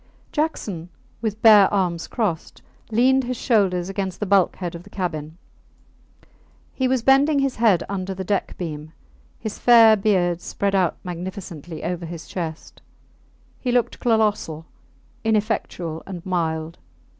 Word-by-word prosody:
Jackson, 210 - -2 0.3
with 220 -1 -3
bare 210 -3 +8
arms 180 -5 0
crossed, 200 -9 -3 0.3
leaned 260 +4 +3
his 250 0 -3
shoulders 190 -8 +1
against 195 -1 -4
the 210 - -1
bulkhead 185 -2 +1
of 170 - -8
the - - -16
cabin. 160 -4 -4 1.4
He 260 - 0
was 255 -2 0
bending 275 +3 +4
his 275 -2 0
head 215 -7 +3
under 190 -1 -4
the 190 - -4
deck 200 +1 -2
beam; 155 -2 -6 0.4
his 220 -2 -6
fair 230 -2 +7
beard 185 -4 +1
spread 200 +3 -2
out 185 -3 +2
magnificently 175 -3 -7
over 175 -1 -3
his 170 -1 -8
chest; 165 -3 -6 0.8
he 250 - -1
looked 245 -1 0
colossal, 210 -9 0 0.6
ineffectual, 210 -7 -1
and 180 -3 -7
mild. 165 -3 -2
190 Hz, 135 wpm, -22 LUFS, 170-220 Hz, 1.4 s, bare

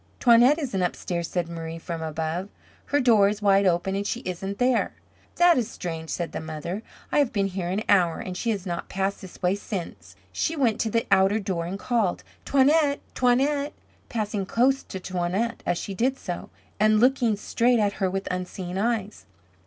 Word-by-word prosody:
"Toinette 245 +4 +6
isn't 255 - -2
upstairs," 175 -1 -2
said 175 -2 -1
Marie 165 -1 -6
from 165 0 -5
above. 160 +4 -3 0.4
"Her 290 - +1
door 225 -6 +5
is 210 0 -3
wide 200 -1 +4
open, 175 +2 +1
and 200 +1 -2
she 240 - -2
isn't 195 +1 -4
there." 250 -1 +2 0.4
"That 350 -5 +5
is 230 -2 -2
strange," 165 -6 -6
said 170 -1 -3
the - - -4
mother. 160 +5 -5 0.3
"I - - +3
have 280 -5 +2
been 200 -3 +1
here 190 -2 -3
an 200 +4 -1
hour, 180 -5 +4
and 185 - -5
she 235 - -2
has 205 -4 -1
not 175 -2 -4
passed 195 +1 -2
this 190 - -11
way 180 +1 +3
since." 200 -3 -6 0.2
She 325 - -1
went 245 -7 +1
to 225 - 0
the 230 +1 0
outer 195 +2 +4
door 185 -5 -2
and 190 +3 -4
called, 220 -4 0 0.2
"Toinette! 280 +1 +3
Toinette!" 280 +4 +2 0.4
passing 210 -3 -2
close 265 +6 +2
to 190 - -7
Toinette 185 +6 -2
as 175 - +1
she 195 - -5
did 255 +7 0
so. 175 -8 -6 0.3
And 215 0 +4
looking 245 -2 +3
straight 235 +4 +2
at 205 -2 +1
her 190 - +2
with 195 +1 -3
unseeing 180 0 -4
eyes. 215 -2 -2
200 Hz, 190 wpm, -25 LUFS, 180-235 Hz, 0.4 s, Toinette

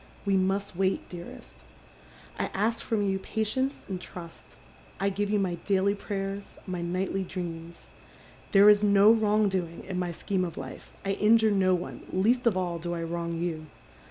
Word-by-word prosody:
We 200 -1 +2
must 195 +1 0
wait, 190 +1 0
dearest. 175 -1 -10 0.8
I - - 0
ask 225 +4 0
from 220 -3 0
you 190 0 0
patience 230 +7 -2
and 185 -2 -4
trust. 170 -2 -11 0.4
I 195 +1 +2
give 200 +1 -2
you 210 - +2
my 180 -4 -1
daily 200 0 +2
prayers, 200 -1 -5
my 180 -2 -4
nightly 185 +2 -1
dreams. 170 -2 -7 0.6
There 200 +1 +7
is 210 -1 +7
no 205 0 +6
wrong 215 -1 +3
doing 180 -4 -3
in 185 -2 -3
my 180 -1 -1
scheme 185 +2 -1
of 170 -3 -5
life. 135 -1 -8
I 195 - +1
injure 220 +2 +4
no 190 -2 +3
one, 175 - -6
least 235 +6 +2
of 205 -5 +3
all 175 -2 -1
do 175 +1 -3
I 165 - -3
wrong 170 0 -3
you. 160 -2 -3
190 Hz, 175 wpm, -28 LUFS, 175-205 Hz, 0.8 s, There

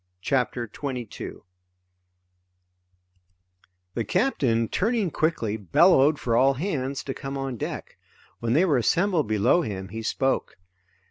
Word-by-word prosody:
CHAPTER 125 -1 0
22 125 -1 -6 2.5
The 115 - -1
captain, 125 - +1
turning 210 - 0
quickly, 120 -11 0
bellowed 145 - +4
for 115 -2 0
all 135 +3 +4
hands 140 -4 -2
to 135 - -4
come 135 +1 -6
on 135 -2 -3
deck. - - -6 0.4
When 115 0 0
they 165 +7 +4
were 150 -7 +3
assembled 165 - +2
below 110 - +3
him 95 - -5
he 115 +3 -6
spoke. 135 +4 -1
135 Hz, 120 wpm, -25 LUFS, 115-160 Hz, 2.5 s, bellowed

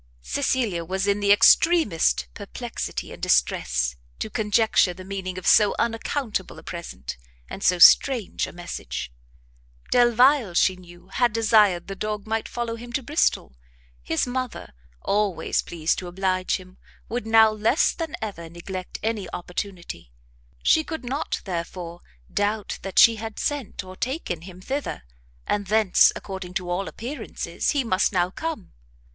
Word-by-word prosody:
Cecilia 235 -11 0
was 190 +3 -2
in 200 0 +1
the 200 0 +3
extremest 205 - +4
perplexity - - -6
and - - -12
distress - - +1 0.2
to 215 - -5
conjecture 210 -4 +2
the 185 0 -10
meaning 190 -1 -5
of 185 - -7
so 210 -2 +5
unaccountable 225 -2 -2
a - - -12
present, 160 - -7 0.3
and - - -8
so 180 - +4
strange 235 +4 +5
a - - -9
message. 175 - -6 0.8
Delvile, 245 -3 +4
she 185 - +4
knew, 175 0 -16
had 240 +3 +2
desired 215 -5 +4
the 195 - -6
dog 210 +1 -4
might 220 0 -2
follow 235 -1 -3
him 240 +1 -10
to 265 - -1
Bristol; 285 - 0 0.5
his 160 - 0
mother, 250 - -4 0.3
always 200 -5 0
pleased 165 -2 -1
to 180 - -7
oblige 185 0 0
him, 185 0 -10 0.3
would 235 -1 -4
now 220 -1 +6
less 215 +7 +2
than 330 -1 -4
ever 170 -6 -6
neglect 180 +2 -7
any 220 -2 -2
opportunity; 175 - -6 0.5
she 315 - +4
could 320 -5 -6
not, 275 +6 -3
therefore, 175 -1 -5 0.3
doubt 205 0 -1
that 195 -1 -7
she 230 -1 +7
had 220 0 -7
sent 285 -8 -3
or 185 0 -11
taken 245 - -3
him 185 +1 -11
thither, 270 - -4 0.4
and 205 -1 -1
thence, 215 -2 +5
according 190 -2 -7
to 180 -2 -2
all 185 +2 -1
appearances, 255 +6 -4
he 285 -2 +1
must 190 -4 +1
now 180 -2 +1
come. 315 - -5
200 Hz, 150 wpm, -24 LUFS, 180-230 Hz, 0.8 s, she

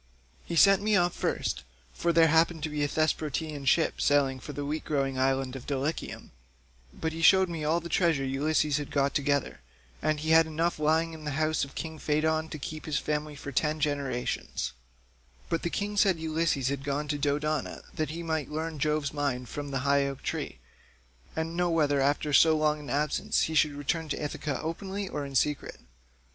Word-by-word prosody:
He 170 - -3
sent 195 +3 +6
me 210 0 +2
off 175 -2 +3
first, - - -1 0.3
for 170 - 0
there 165 -1 +5
happened 160 0 +3
to 155 - -1
be 150 -1 -1
a - - +2
Thesprotian 155 -1 -1
ship 160 +4 +2
sailing 135 -2 +3
for 145 - -8
the 145 0 -4
wheat 150 +2 -3
growing 135 -3 -1
island 135 0 +1
of 130 - -8
Dulichium, 140 +3 -3 0.6
but 160 - -3
he 165 - -5
showed 190 +2 +6
me 165 -3 -4
all 160 +3 +2
the 170 - -7
treasure 165 -5 +2
Ulysses 150 +2 +1
had 145 - -4
got 140 0 +1
together, 140 - 0 0.4
and 155 -1 +1
he 160 +1 0
had 160 0 +6
enough 165 +1 -1
lying 160 +2 +2
in 160 -1 -9
the 150 -1 -3
house 155 0 +1
of 140 - -7
king 160 -1 -5
Pheidon 155 +1 +1
to - - -6
keep 155 +2 -7
his 150 -2 0
family 150 0 -2
for 145 0 -7
ten 155 +3 0
generations; 140 - -2 0.8
but 165 - 0
the 170 - -1
king 205 +3 -3
said 195 -3 +4
Ulysses 160 -4 0
had 140 -1 -3
gone 145 +1 -2
to 145 0 -2
Dodona 150 +1 -1
that 155 -2 -2
he 170 +2 -5
might 160 -3 -2
learn 155 0 -4
Jove's 150 0 0
mind 135 -4 -2
from 145 -1 -5
the 135 -2 -2
high 140 0 +3
oak 135 -1 -6
tree, - - -3 0.8
and 160 +1 -2
know 175 0 +1
whether 145 -4 +2
after 145 +2 +1
so 160 +3 +6
long 155 0 +1
an 145 - -9
absence 145 +3 +1
he 160 - -1
should 150 -1 +3
return 150 +3 -2
to - - -2
Ithaca 145 -1 -3
openly 190 +5 -4
or 150 -5 -4
in 135 - -9
secret. 150 +2 0
150 Hz, 200 wpm, -28 LUFS, 140-160 Hz, 0.8 s, sent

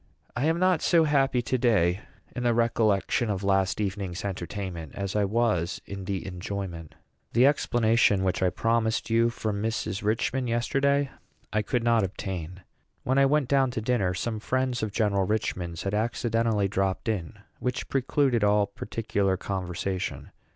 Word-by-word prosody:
I 125 - 0
am 165 +1 +2
not 185 -2 +3
so 170 -2 +4
happy 135 -4 +2
to 130 +2 -1
day 95 -7 +3 0.4
in 125 - -3
the 120 -1 +2
recollection 115 -1 +1
of 100 -1 -2
last 95 -1 +1
evening's 95 -2 -3
entertainment 90 -4 -5
as 100 0 -3
I 105 -1 +3
was 105 -5 0
in 100 -1 -7
the 95 -1 -3
enjoyment. 90 -3 -6 0.4
The 120 +3 +5
explanation 115 -7 +3
which 95 0 0
I 95 - +4
promised 115 +3 0
you 115 +1 +4
from 110 -3 -3
Mrs. 110 -3 -2
Richman 120 +4 0
yesterday 135 +4 +1 0.4
I 110 - +2
could 115 +3 -1
not 115 -2 +3
obtain. 90 -2 -5 0.4
When 130 +2 +2
I 135 - +5
went 145 -1 +2
down 135 -1 +3
to 120 - -3
dinner 105 -6 0
some 110 +3 -2
friends 130 +1 -1
of 110 -2 -2
General 100 -3 +1
Richman's 90 -6 -2
had 100 - -2
accidentally 115 -1 +1
dropped 95 0 -1
in, 105 -2 -2 0.2
which 125 0 -2
precluded 135 -3 +1
all 105 0 +4
particular 100 -1 -2
conversation. 95 0 -4
110 Hz, 160 wpm, -27 LUFS, 95-120 Hz, 0.4 s, The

